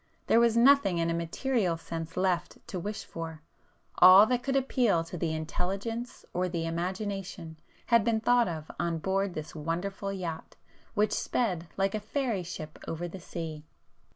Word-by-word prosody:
There 230 Hz, -, +5 dB
was 235 Hz, -1 st, +4 dB
nothing 240 Hz, -7 st, +5 dB
in 165 Hz, 0 st, +1 dB
a -, -, 0 dB
material 175 Hz, +3 st, 0 dB
sense 165 Hz, 0 st, -6 dB
left 180 Hz, -2 st, 0 dB
to 185 Hz, -, -3 dB
wish 210 Hz, +4 st, -4 dB
for,—all 165 Hz, +4 st, +3 dB
that 245 Hz, +2 st, 0 dB
could 270 Hz, +1 st, -1 dB
appeal 245 Hz, -10 st, +2 dB
to 165 Hz, -, -8 dB
the 165 Hz, -1 st, -1 dB
intelligence 195 Hz, +9 st, -3 dB
or 180 Hz, +1 st, 0 dB
the 165 Hz, -2 st, -2 dB
imagination 180 Hz, -1 st, -4 dB, 0.3 s
had 235 Hz, -2 st, +4 dB
been 225 Hz, 0 st, +2 dB
thought 240 Hz, +1 st, +4 dB
of 160 Hz, -3 st, -5 dB
on 170 Hz, -1 st, 0 dB
board 190 Hz, +2 st, -1 dB
this 155 Hz, -1 st, -6 dB
wonderful 175 Hz, +6 st, -3 dB
yacht 175 Hz, -4 st, -5 dB, 0.4 s
which 210 Hz, 0 st, +2 dB
sped 180 Hz, -9 st, -1 dB
like 195 Hz, 0 st, +1 dB
a 215 Hz, -, -1 dB
fairy 225 Hz, -1 st, -1 dB
ship 155 Hz, -3 st, -7 dB
over 170 Hz, +2 st, -3 dB
the 185 Hz, +2 st, -8 dB
sea. 160 Hz, -3 st, -6 dB
185 Hz, 160 wpm, -29 LUFS, 165-215 Hz, 0.4 s, There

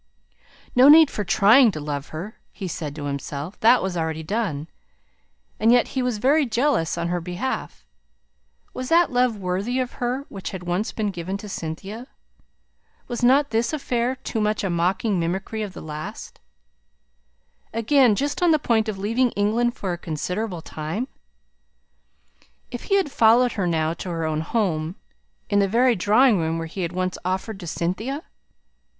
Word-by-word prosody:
No 255 Hz, +3 st, +7 dB
need 310 Hz, -1 st, +8 dB
for 210 Hz, -, -3 dB
"trying" 225 Hz, +6 st, +6 dB
to 155 Hz, -, -5 dB
love 145 Hz, -1 st, -4 dB
her, 180 Hz, +8 st, -8 dB
he 195 Hz, -, -6 dB
said 150 Hz, -4 st, -5 dB
to 145 Hz, -2 st, -6 dB
himself, 140 Hz, +4 st, -5 dB
that 235 Hz, +1 st, +5 dB
was 190 Hz, -1 st, -2 dB
already 160 Hz, -1 st, -2 dB
done. 170 Hz, -6 st, -2 dB, 0.9 s
And 225 Hz, +2 st, +4 dB
yet 245 Hz, 0 st, +4 dB
he 265 Hz, -, -2 dB
was 250 Hz, -3 st, -1 dB
very 280 Hz, +8 st, +3 dB
jealous 235 Hz, -, 0 dB
on 170 Hz, 0 st, -2 dB
her 175 Hz, 0 st, -1 dB
behalf. 180 Hz, +9 st, -4 dB, 0.9 s
Was 255 Hz, 0 st, -5 dB
that 335 Hz, -1 st, +4 dB
love 245 Hz, -3 st, +2 dB
worthy 195 Hz, +6 st, -2 dB
of 255 Hz, -1 st, -2 dB
her 250 Hz, +3 st, -1 dB
which 195 Hz, -2 st, -6 dB
had 185 Hz, -2 st, -7 dB
once 180 Hz, +5 st, -1 dB
been 210 Hz, -2 st, -2 dB
given 185 Hz, +2 st, -4 dB
to 210 Hz, -, -9 dB
Cynthia? 195 Hz, +7 st, -6 dB, 1.0 s
Was 240 Hz, -1 st, -4 dB
not 275 Hz, +4 st, +4 dB
this 230 Hz, +5 st, 0 dB
affair 255 Hz, -4 st, -1 dB
too 235 Hz, -3 st, -4 dB
much 210 Hz, 0 st, 0 dB
a 195 Hz, -, -1 dB
mocking 180 Hz, +4 st, 0 dB
mimicry 190 Hz, +6 st, -2 dB
of 205 Hz, -3 st, -5 dB
the -, -, -9 dB
last 155 Hz, +7 st, -7 dB, 1.3 s
again 235 Hz, 0 st, +3 dB
just 285 Hz, -, -2 dB
on 350 Hz, -, +4 dB
the 315 Hz, -, +5 dB
point 225 Hz, -6 st, +1 dB
of 205 Hz, -, -4 dB
leaving 230 Hz, +6 st, +1 dB
England 230 Hz, +4 st, +1 dB
for 190 Hz, -7 st, -3 dB
a 175 Hz, -, -6 dB
considerable 180 Hz, +3 st, -4 dB
time 160 Hz, +11 st, -4 dB, 1.6 s
if -, -, -6 dB
he 395 Hz, -1 st, +3 dB
followed 245 Hz, -4 st, +4 dB
her 190 Hz, -4 st, -1 dB
now 160 Hz, -1 st, 0 dB
to 180 Hz, -, -7 dB
her 165 Hz, -2 st, -2 dB
own 155 Hz, -1 st, -1 dB
home, 165 Hz, -4 st, -1 dB, 0.5 s
in 205 Hz, -1 st, +2 dB
the 200 Hz, -, +3 dB
very 240 Hz, +4 st, +3 dB
drawing 215 Hz, +3 st, +4 dB
room 165 Hz, 0 st, -1 dB
where 165 Hz, -, -3 dB
he 170 Hz, +4 st, -6 dB
had 170 Hz, -1 st, -2 dB
once 185 Hz, 0 st, -2 dB
offered 190 Hz, +3 st, -3 dB
to 175 Hz, -, -8 dB
Cynthia? 220 Hz, -, -3 dB
205 Hz, 170 wpm, -23 LUFS, 175-245 Hz, 1.6 s, need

